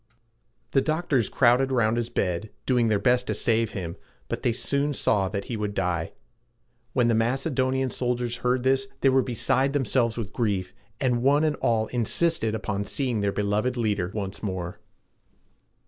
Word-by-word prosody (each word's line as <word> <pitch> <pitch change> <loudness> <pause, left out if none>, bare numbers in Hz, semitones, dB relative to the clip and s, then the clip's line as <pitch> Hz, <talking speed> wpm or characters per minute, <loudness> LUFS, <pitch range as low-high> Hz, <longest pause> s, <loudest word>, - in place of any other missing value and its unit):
The 135 - +3
doctors 155 - 0
crowded 130 +2 +3
around 115 -3 +2
his 120 0 -1
bed, 90 +3 -1 0.2
doing 125 -3 +2
their 110 -2 +2
best 125 +3 +2
to - - -1
save 115 -1 +1
him, 85 -4 -5 0.3
but - - -3
they 120 - +2
soon 140 +4 0
saw 100 -6 +1
that 100 0 -4
he 120 - -4
would 105 -1 -3
die. 85 -4 -1 0.8
When 125 -3 +3
the 115 - +3
Macedonian 130 +2 0
soldiers 120 -1 -1
heard 125 0 0
this, 135 0 +2
they 135 - +5
were 130 0 +4
beside 130 +2 +1
themselves 125 -4 +1
with 110 -3 -5
grief, 100 -6 -1 0.3
and 125 -2 +1
one 140 +4 +4
and 155 -1 +1
all 110 -2 +1
insisted 120 0 0
upon 105 -2 -2
seeing 125 -2 -1
their 100 0 +1
beloved 105 +5 0
leader 105 -6 0
once 100 -3 -4
more. 95 -1 -4
120 Hz, 165 wpm, -26 LUFS, 105-130 Hz, 0.8 s, they